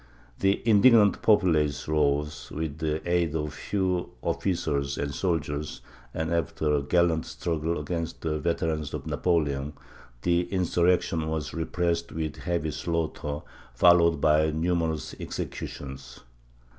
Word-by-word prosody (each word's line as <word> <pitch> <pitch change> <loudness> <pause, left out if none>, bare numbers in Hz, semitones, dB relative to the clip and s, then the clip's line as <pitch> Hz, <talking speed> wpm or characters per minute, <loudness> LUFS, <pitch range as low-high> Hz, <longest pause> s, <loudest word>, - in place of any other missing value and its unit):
The 95 0 +2
indignant 110 -1 +6
populace 85 -9 +3
rose, 75 -1 0
with 80 -1 -4
the 80 +1 -2
aid 85 -3 +1
of 75 -1 -1
a - - -11
few 95 0 -1
officers 70 -7 -1
and 70 0 -2
soldiers 75 -3 -2 0.3
and, 80 +4 -2
after 80 -2 0
a 75 - +2
gallant 85 +2 +2
struggle 80 0 -2
against 85 +2 -4
the 75 -1 -1
veterans 80 -2 -1
of - - -6
Napoleon, 75 -5 0 0.5
the 85 0 +1
insurrection 90 -3 +1
was 80 -2 -3
repressed 85 0 -1
with 80 -2 -4
heavy 85 -3 -2
slaughter, 80 -2 -3 0.3
followed 85 +1 +5
by 75 +1 +4
numerous 80 0 -1
executions. 65 -3 -6
80 Hz, 120 wpm, -27 LUFS, 75-85 Hz, 0.5 s, indignant